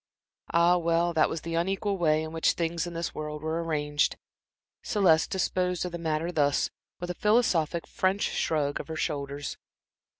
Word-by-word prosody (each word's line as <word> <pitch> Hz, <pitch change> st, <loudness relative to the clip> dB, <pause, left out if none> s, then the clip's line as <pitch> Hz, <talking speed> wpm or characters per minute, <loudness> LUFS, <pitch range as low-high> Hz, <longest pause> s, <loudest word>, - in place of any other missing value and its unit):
Ah, 170 Hz, +1 st, +5 dB
well, 170 Hz, 0 st, +1 dB
that 160 Hz, -1 st, +3 dB
was 160 Hz, -, -4 dB
the 165 Hz, -, -5 dB
unequal 195 Hz, +4 st, 0 dB
way 155 Hz, -4 st, +2 dB
in 160 Hz, -, -6 dB
which 165 Hz, 0 st, +2 dB
things 170 Hz, 0 st, -1 dB
in 170 Hz, -, -7 dB
this 170 Hz, 0 st, -3 dB
world 150 Hz, 0 st, -5 dB
were 160 Hz, +1 st, -1 dB
arranged. 150 Hz, -2 st, 0 dB, 0.6 s
Celeste 185 Hz, -8 st, +3 dB
disposed 180 Hz, -1 st, 0 dB
of 180 Hz, -, -4 dB
the 170 Hz, -, -5 dB
matter 160 Hz, +1 st, -1 dB
thus, 145 Hz, -4 st, +1 dB, 0.3 s
with 175 Hz, 0 st, -3 dB
a 180 Hz, -, -10 dB
philosophic 180 Hz, -7 st, +2 dB
French 195 Hz, -2 st, 0 dB
shrug 145 Hz, -3 st, 0 dB
of -, -, -6 dB
the 160 Hz, -, -5 dB
shoulders. 145 Hz, -3 st, -3 dB
165 Hz, 170 wpm, -28 LUFS, 155-180 Hz, 0.6 s, Ah